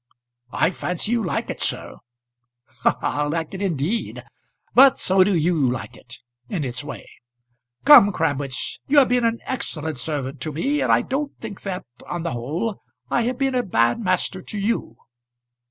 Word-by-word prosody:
"I 165 - +2
fancy 180 +3 -2
you 235 -2 +1
like 175 - -2
it, - - -8
sir." - - -2 0.8
"Ha! - - +2
ha! 145 0 0
Like 160 +2 -3
it, 190 - -5
indeed! 185 - -2 0.5
But 270 +1 +7
so 190 0 +4
do 195 0 +1
you 160 -5 +2
like 125 - -5
it 125 -1 -12 0.3
in 170 -6 -2
its 130 +1 -2
way. 145 - -8 0.8
Come, 280 -9 +9
Crabwitz, 145 -7 -2
you 290 - +2
have 275 - +7
been 245 -1 +2
an 230 0 0
excellent 160 - -3
servant 140 -1 -4
to 155 - -3
me; 275 - 0
and - - +2
I - - +4
don't 280 +2 -3
think 215 -4 -8
that, 190 -2 -5 0.2
on 175 -1 -4
the 170 - -2
whole, 155 - -3 0.3
I - - +2
have 250 +1 -1
been 270 0 0
a 250 - +2
bad 120 - +1
master 185 -2 -1
to 210 - -7
you." 200 - -2
180 Hz, 175 wpm, -22 LUFS, 145-230 Hz, 0.8 s, Come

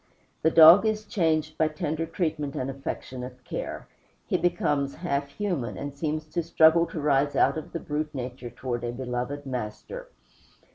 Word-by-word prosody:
The 160 - +4
dog 165 +4 +9
is 215 -1 0
changed 160 -7 0
by 160 - +4
tender 155 +1 -3
treatment 155 -4 -2
and 130 +1 -2
affectionate 125 -2 -6
care; - - -5 0.4
he - - -1
becomes 145 -5 +1
half 140 -5 -2
human, 175 - -3
and 140 0 -5
seems 155 +1 -2
to 175 - +1
struggle 165 +1 +5
to - - -6
rise 145 -1 +2
out 140 - +4
of 155 - -6
the 170 - -3
brute 150 0 -3
nature 125 -1 -5
toward 120 0 -4
a 120 - -2
beloved 125 +3 -4
master. 130 - -5
150 Hz, 160 wpm, -27 LUFS, 130-165 Hz, 0.4 s, dog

